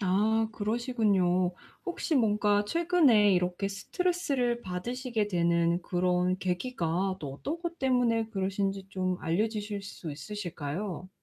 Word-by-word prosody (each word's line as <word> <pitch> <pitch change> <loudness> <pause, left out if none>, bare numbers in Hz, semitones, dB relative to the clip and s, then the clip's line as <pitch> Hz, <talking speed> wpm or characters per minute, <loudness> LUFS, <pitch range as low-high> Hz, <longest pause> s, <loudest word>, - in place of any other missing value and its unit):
아 215 +4 +2
그러시군요. 205 -6 +1 0.3
혹시 345 -2 -1
뭔가 210 -3 +3
최근에 290 - +4
이렇게 180 +2 0
스트레스를 265 - -1
받으시게 225 +4 -2
되는 170 -1 +2
그런 180 +1 +1
계기가 185 -1 -1
또 140 -3 -5
어떤 295 - -4
것 340 0 -5
때문에 245 -4 +2
그러신지 195 -1 -1
좀 185 -2 -1
알려 175 +7 +1
주실 210 -2 -4
수 185 -4 -7
있으실까요? 175 +2 -5
205 Hz, 290 characters per minute, -29 LUFS, 180-235 Hz, 0.3 s, 최근에